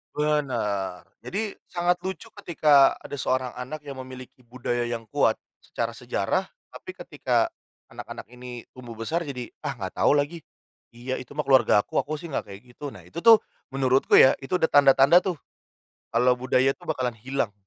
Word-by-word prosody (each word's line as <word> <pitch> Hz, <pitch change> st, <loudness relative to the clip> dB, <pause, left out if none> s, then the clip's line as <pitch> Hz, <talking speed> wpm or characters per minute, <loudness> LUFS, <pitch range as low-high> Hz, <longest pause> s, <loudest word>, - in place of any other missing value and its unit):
Benar, 115 Hz, -11 st, -1 dB, 0.2 s
jadi 210 Hz, +1 st, -4 dB
sangat 175 Hz, 0 st, 0 dB
lucu 190 Hz, -2 st, -6 dB
ketika 150 Hz, -5 st, +4 dB
ada 145 Hz, -, -7 dB
seorang 130 Hz, -1 st, -1 dB
anak 130 Hz, +5 st, -7 dB
yang 140 Hz, -2 st, -8 dB
memiliki 130 Hz, 0 st, -10 dB
budaya 120 Hz, -1 st, -2 dB
yang 115 Hz, -1 st, -4 dB
kuat -, -, +3 dB, 0.2 s
secara -, -, -4 dB
sejarah, -, -, -2 dB, 0.2 s
tapi -, -, -10 dB
ketika -, -, -1 dB, 0.4 s
anak-anak -, -, -8 dB
ini 125 Hz, -1 st, -9 dB
tumbuh 120 Hz, -3 st, -10 dB
besar 160 Hz, +8 st, -3 dB
jadi 125 Hz, -3 st, -6 dB
"Ah 140 Hz, -, -4 dB
gak 95 Hz, -5 st, -5 dB
tau 145 Hz, -, +4 dB
lagi, 145 Hz, +4 st, -1 dB, 0.6 s
iya 130 Hz, +2 st, -4 dB
itu 130 Hz, +3 st, -11 dB
mah 150 Hz, -, -1 dB
keluargaku, 120 Hz, -6 st, +3 dB
aku 155 Hz, +1 st, -3 dB
sih 160 Hz, +1 st, -8 dB
gak -, -, -3 dB
kayak 100 Hz, +3 st, -11 dB
gitu," 130 Hz, +1 st, -9 dB
nah 90 Hz, -, -13 dB
itu 90 Hz, -, -8 dB
tuh, 225 Hz, +3 st, +7 dB, 0.3 s
menurutku 135 Hz, 0 st, +3 dB
ya 130 Hz, -, +8 dB
itu 135 Hz, +7 st, -3 dB
ada 160 Hz, -2 st, +1 dB
tanda-tanda 140 Hz, +3 st, +6 dB
tuh, 185 Hz, -2 st, -3 dB, 0.8 s
kalau 125 Hz, +2 st, +3 dB
budaya 130 Hz, +1 st, +2 dB
itu -, -, -17 dB
bakalan 125 Hz, -3 st, -2 dB
hilang. 125 Hz, -2 st, -2 dB
130 Hz, 165 wpm, -25 LUFS, 120-150 Hz, 0.8 s, ya